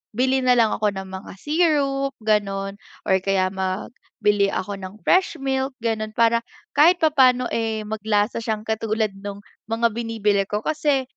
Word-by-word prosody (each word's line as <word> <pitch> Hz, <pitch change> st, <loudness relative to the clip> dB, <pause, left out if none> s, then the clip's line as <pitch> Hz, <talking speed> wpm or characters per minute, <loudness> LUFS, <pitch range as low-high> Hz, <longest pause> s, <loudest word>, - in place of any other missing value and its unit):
bili 260 Hz, +2 st, +2 dB
na 250 Hz, -, +5 dB
lang 230 Hz, -3 st, +3 dB
ako 215 Hz, -, 0 dB
ng 190 Hz, 0 st, -6 dB
mga 190 Hz, +1 st, -8 dB
syrup, 280 Hz, -, +1 dB
gano'n 200 Hz, -2 st, 0 dB, 0.3 s
or 190 Hz, -, +3 dB
kaya 190 Hz, 0 st, +1 dB
mag 190 Hz, +2 st, -3 dB, 0.3 s
bili 205 Hz, -1 st, +4 dB
ako 195 Hz, 0 st, -3 dB
ng 190 Hz, +1 st, -8 dB
fresh 370 Hz, -1 st, +3 dB
milk, 270 Hz, -2 st, -2 dB
gano'n 215 Hz, -1 st, -2 dB
para 230 Hz, 0 st, +4 dB, 0.4 s
kahit 325 Hz, +5 st, +7 dB
papa'no, 255 Hz, -5 st, +4 dB
eh, 225 Hz, -1 st, -1 dB
maglasa 210 Hz, 0 st, -1 dB
siyang 220 Hz, -2 st, -3 dB
katulad 220 Hz, -1 st, -1 dB
nung 200 Hz, 0 st, -7 dB, 0.2 s
mga 230 Hz, +1 st, +1 dB
binibili 210 Hz, -3 st, 0 dB
ko, 210 Hz, +1 st, -3 dB
kasi 295 Hz, -3 st, +1 dB
220 Hz, 155 wpm, -22 LUFS, 205-260 Hz, 0.4 s, kahit